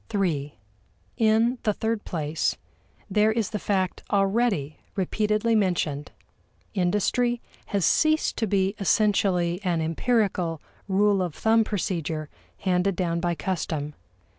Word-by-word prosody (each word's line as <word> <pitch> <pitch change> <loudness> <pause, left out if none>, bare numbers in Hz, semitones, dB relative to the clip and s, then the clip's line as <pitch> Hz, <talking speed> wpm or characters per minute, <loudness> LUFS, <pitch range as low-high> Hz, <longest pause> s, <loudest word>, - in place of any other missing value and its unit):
(iii) 150 -8 -1 0.6
In 225 +3 +3
the 210 - +1
third 220 +1 -2
place, 155 - -1 0.5
there 210 +2 +3
is 220 -2 -1
the 210 - -2
fact 190 -3 -1
already 195 - +1 0.2
repeatedly 215 +3 +1
mentioned: 175 -8 0 0.6
Industry 210 +6 +1 0.3
has 200 -5 0
ceased 310 0 +3
to 225 - 0
be 195 0 +1
essentially 190 -4 +2
an 175 -3 +1
empirical, 175 -1 0 0.3
rule 200 0 +3
of 175 -4 -3
thumb 225 0 +3
procedure, 165 -7 -3 0.3
handed 185 0 +1
down 170 -2 -1
by 175 0 0
custom. 160 -5 -3
195 Hz, 115 wpm, -25 LUFS, 170-215 Hz, 0.6 s, In